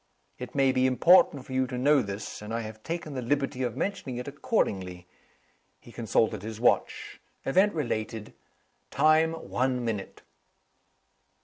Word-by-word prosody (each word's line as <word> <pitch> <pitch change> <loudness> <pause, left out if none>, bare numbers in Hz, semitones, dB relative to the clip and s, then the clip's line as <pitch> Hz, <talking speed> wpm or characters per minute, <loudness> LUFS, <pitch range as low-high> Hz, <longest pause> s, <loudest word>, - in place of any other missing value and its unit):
It 125 +1 -8
may 135 -1 +4
be 130 0 +2
important 140 0 +4
for 130 - -9
you 130 0 +1
to 125 - -5
know 140 +2 +4
this; 100 -1 -6
and 105 +1 -8
I 115 - -1
have 110 -1 -9
taken 165 0 -5
the 130 - -3
liberty 135 +1 -1
of 120 -3 -2
mentioning 190 -11 -3
it 125 - -6
accordingly." 95 - -2 0.7
He 120 - -15
consulted 115 -2 0
his 110 +1 -7
watch. 120 - 0 0.3
"Event 190 +7 +3
related. 110 -6 -3 0.6
Time, 155 +2 +3
one 125 -5 -2
minute." 105 -4 -5
125 Hz, 145 wpm, -27 LUFS, 110-145 Hz, 0.7 s, may